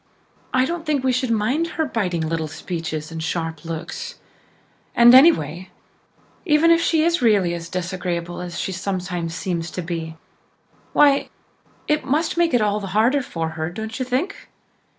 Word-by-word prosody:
I 255 Hz, 0 st, +3 dB
don't 335 Hz, +3 st, -3 dB
think 300 Hz, -4 st, 0 dB
we 260 Hz, -, +2 dB
should 255 Hz, 0 st, 0 dB
mind 230 Hz, +9 st, +1 dB
her 320 Hz, -, +2 dB
biting 180 Hz, -, -1 dB
little 160 Hz, -1 st, -2 dB
speeches 160 Hz, 0 st, -5 dB
and 165 Hz, 0 st, -5 dB
sharp 165 Hz, -1 st, -3 dB
looks. 165 Hz, 0 st, -6 dB, 0.8 s
And 240 Hz, +1 st, +8 dB
anyway, 185 Hz, -, +5 dB, 0.7 s
even 320 Hz, -1 st, +4 dB
if 335 Hz, 0 st, +5 dB
she 320 Hz, -2 st, +2 dB
is 340 Hz, -1 st, +2 dB
really 205 Hz, -7 st, +3 dB
as 170 Hz, -1 st, -6 dB
disagreeable 175 Hz, -1 st, -3 dB
as 175 Hz, -1 st, -6 dB
she -, -, -2 dB
sometimes 180 Hz, -3 st, -3 dB
seems 175 Hz, -2 st, -3 dB
to 180 Hz, -, -5 dB
be, 165 Hz, -1 st, -5 dB, 0.8 s
why, 285 Hz, -1 st, +4 dB, 0.6 s
it 300 Hz, 0 st, +1 dB
must 305 Hz, +5 st, 0 dB
make 340 Hz, -5 st, +2 dB
it 230 Hz, -, +3 dB
all 210 Hz, 0 st, +1 dB
the 195 Hz, 0 st, -4 dB
harder 250 Hz, +6 st, +3 dB
for 165 Hz, -9 st, -4 dB
her, 160 Hz, 0 st, -4 dB
don't 220 Hz, +6 st, -6 dB
you -, -, 0 dB
think? 260 Hz, +11 st, -3 dB
190 Hz, 165 wpm, -22 LUFS, 170-265 Hz, 0.8 s, And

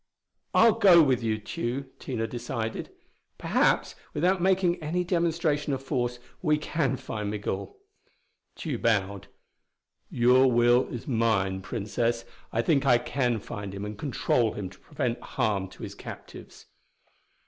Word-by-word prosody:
"I'll 230 Hz, -2 st, +5 dB
go 175 Hz, -4 st, +8 dB
with 130 Hz, -4 st, +2 dB
you, 110 Hz, -1 st, 0 dB
Tugh." 120 Hz, +5 st, -4 dB
Tina 115 Hz, -4 st, -3 dB
decided. 115 Hz, -1 st, -4 dB, 0.5 s
"Perhaps, -, -, +2 dB, 0.2 s
without 180 Hz, +4 st, +2 dB
making 185 Hz, -2 st, +2 dB
any 170 Hz, +4 st, -1 dB
demonstration 170 Hz, -4 st, 0 dB
of 135 Hz, 0 st, -3 dB
force, 125 Hz, -2 st, -1 dB, 0.2 s
we 155 Hz, -3 st, +3 dB
can 150 Hz, -3 st, -1 dB
find 110 Hz, -5 st, -4 dB
Migul." 105 Hz, -, -4 dB, 0.8 s
Tugh 145 Hz, -8 st, -4 dB
bowed. 100 Hz, -3 st, 0 dB, 0.8 s
"Your 125 Hz, +2 st, +4 dB
will 120 Hz, +1 st, +4 dB
is 120 Hz, -, -7 dB
mine, 110 Hz, -6 st, +1 dB
Princess. 115 Hz, +3 st, -2 dB, 0.3 s
I 115 Hz, -, 0 dB
think 145 Hz, -2 st, +2 dB
I 125 Hz, -3 st, +5 dB
can 120 Hz, -1 st, -1 dB
find 100 Hz, -1 st, -7 dB
him 100 Hz, +1 st, -5 dB
and 105 Hz, +1 st, -5 dB
control 120 Hz, -2 st, 0 dB
him 95 Hz, -3 st, -5 dB
to 95 Hz, -, -17 dB
prevent 125 Hz, -5 st, -3 dB
harm 105 Hz, -6 st, -1 dB
to -, -, -13 dB
his -, -, -6 dB
captives." -, -, -11 dB
120 Hz, 135 wpm, -27 LUFS, 110-150 Hz, 0.8 s, go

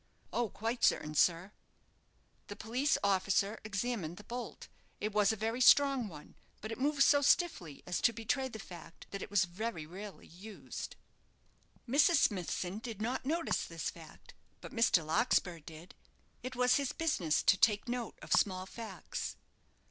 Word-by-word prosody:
"Oh, 240 Hz, -2 st, 0 dB
quite 230 Hz, +4 st, -3 dB
certain, 150 Hz, -, +2 dB
sir." 175 Hz, +5 st, +2 dB, 1.0 s
The 205 Hz, -, -7 dB
police 250 Hz, +8 st, 0 dB
officer 200 Hz, +2 st, +1 dB
examined 200 Hz, -5 st, -3 dB
the 210 Hz, -, -11 dB
bolt. 245 Hz, +2 st, -7 dB, 0.3 s
It 215 Hz, -, -2 dB
was 210 Hz, -1 st, +4 dB
a -, -, -1 dB
very 225 Hz, +4 st, -2 dB
strong 275 Hz, -2 st, +5 dB
one; 150 Hz, -6 st, -12 dB, 0.3 s
but 215 Hz, -, -6 dB
it 225 Hz, -, -5 dB
moved 285 Hz, +1 st, +3 dB
so 285 Hz, +1 st, +5 dB
stiffly 275 Hz, -, +1 dB
as 180 Hz, -, -2 dB
to 235 Hz, -, +4 dB
betray 230 Hz, +4 st, -1 dB
the 230 Hz, -, -8 dB
fact 175 Hz, -5 st, -11 dB
that 200 Hz, -, -5 dB
it -, -, -6 dB
was 200 Hz, -3 st, +3 dB
very 185 Hz, -2 st, -5 dB
rarely 185 Hz, +1 st, -9 dB
used. 195 Hz, +5 st, -8 dB, 0.9 s
Mrs. 290 Hz, +7 st, +4 dB
Smithson 190 Hz, -, 0 dB
did 225 Hz, -3 st, -7 dB
not 250 Hz, +4 st, -2 dB
notice 330 Hz, +3 st, 0 dB
this -, -, -4 dB
fact; -, -, -14 dB, 0.3 s
but -, -, -10 dB
Mr. 215 Hz, -8 st, +3 dB
Larkspur 175 Hz, 0 st, +1 dB
did. 160 Hz, +3 st, -12 dB, 0.5 s
It 255 Hz, 0 st, -6 dB
was 250 Hz, 0 st, +4 dB
his 280 Hz, -2 st, -1 dB
business 195 Hz, -, 0 dB
to -, -, +5 dB
take 210 Hz, +3 st, +2 dB
note 240 Hz, -1 st, -4 dB
of -, -, -1 dB
small 185 Hz, -2 st, +2 dB
facts. 225 Hz, +3 st, -6 dB
215 Hz, 160 wpm, -33 LUFS, 185-250 Hz, 1.0 s, strong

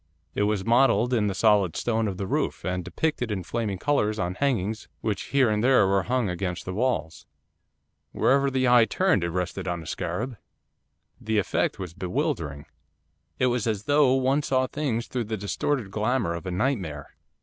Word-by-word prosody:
It -, -, -1 dB
was 105 Hz, -3 st, -1 dB
modelled 120 Hz, 0 st, +3 dB
in 110 Hz, -4 st, +2 dB
the 100 Hz, -, -2 dB
solid 100 Hz, -4 st, +3 dB
stone 115 Hz, -2 st, 0 dB
of 95 Hz, -3 st, -4 dB
the 100 Hz, -, -3 dB
roof, 95 Hz, -, -2 dB
and 90 Hz, 0 st, -2 dB
depicted 150 Hz, -, -2 dB
in 95 Hz, -3 st, -2 dB
flaming 105 Hz, 0 st, -2 dB
colours 110 Hz, -3 st, +1 dB
on 90 Hz, -2 st, -1 dB
hangings 110 Hz, -4 st, -1 dB
which 105 Hz, -3 st, -2 dB
here 140 Hz, -3 st, +3 dB
and 105 Hz, 0 st, 0 dB
there 125 Hz, -5 st, +5 dB
were 95 Hz, 0 st, +2 dB
hung 125 Hz, +3 st, 0 dB
against 90 Hz, -1 st, -3 dB
the 95 Hz, -, -4 dB
walls. 90 Hz, -, -2 dB, 0.8 s
Wherever 140 Hz, +1 st, +2 dB
the 130 Hz, -1 st, +1 dB
eye 120 Hz, -2 st, +6 dB
turned 185 Hz, -, +1 dB
it 85 Hz, -, -1 dB
rested 90 Hz, +1 st, -3 dB
on 85 Hz, -2 st, -3 dB
a -, -, -13 dB
scarab. 120 Hz, -, -4 dB, 0.8 s
The 110 Hz, 0 st, -1 dB
effect 100 Hz, -, 0 dB
was 90 Hz, -4 st, -6 dB
bewildering. 80 Hz, -5 st, -3 dB, 0.7 s
It -, -, +2 dB
was 120 Hz, -2 st, -1 dB
as 105 Hz, -2 st, -1 dB
though 145 Hz, 0 st, +4 dB
one 135 Hz, +2 st, +2 dB
saw 130 Hz, -3 st, +1 dB
things 130 Hz, -5 st, -2 dB
through 125 Hz, -3 st, -3 dB
the 110 Hz, +1 st, -3 dB
distorted 105 Hz, +2 st, -2 dB
glamour 110 Hz, -3 st, 0 dB
of 85 Hz, +2 st, -6 dB
a -, -, -2 dB
nightmare. 90 Hz, -, -2 dB
110 Hz, 180 wpm, -26 LUFS, 95-130 Hz, 0.8 s, eye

